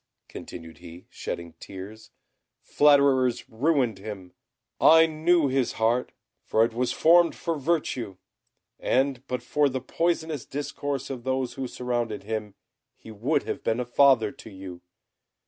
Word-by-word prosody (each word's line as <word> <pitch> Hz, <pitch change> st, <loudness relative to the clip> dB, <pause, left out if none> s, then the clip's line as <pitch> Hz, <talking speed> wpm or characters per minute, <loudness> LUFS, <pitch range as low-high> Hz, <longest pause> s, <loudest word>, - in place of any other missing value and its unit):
continued 80 Hz, 0 st, -10 dB
he, 85 Hz, 0 st, -12 dB
shedding 85 Hz, -1 st, -6 dB
tears, 100 Hz, +4 st, -10 dB, 0.5 s
"flatterers 140 Hz, -4 st, +3 dB
ruined 125 Hz, -3 st, 0 dB
him. 95 Hz, -3 st, -8 dB, 0.5 s
I 160 Hz, 0 st, +7 dB
knew 160 Hz, 0 st, +2 dB
his 130 Hz, -1 st, 0 dB
heart, 115 Hz, +3 st, 0 dB, 0.4 s
it 115 Hz, +1 st, +3 dB
was 125 Hz, +2 st, 0 dB
formed 170 Hz, +1 st, +4 dB
for 165 Hz, -1 st, -2 dB
virtue; 135 Hz, -, -2 dB, 0.6 s
and 135 Hz, -1 st, +1 dB
but 125 Hz, -1 st, -3 dB
for 145 Hz, +3 st, +2 dB
the 130 Hz, 0 st, -3 dB
poisonous 160 Hz, +1 st, -1 dB
discourse 140 Hz, -1 st, -4 dB
of 125 Hz, -3 st, -6 dB
those 130 Hz, -1 st, -1 dB
who 135 Hz, -1 st, -4 dB
surrounded 120 Hz, -3 st, -3 dB
him, 105 Hz, -1 st, -4 dB, 0.4 s
he 110 Hz, -, -13 dB
would 105 Hz, -, 0 dB
have -, -, -5 dB
been 115 Hz, +2 st, 0 dB
a 125 Hz, -, -2 dB
father 120 Hz, -3 st, +4 dB
to -, -, -13 dB
you. 95 Hz, -3 st, -10 dB
125 Hz, 135 wpm, -26 LUFS, 110-145 Hz, 0.6 s, I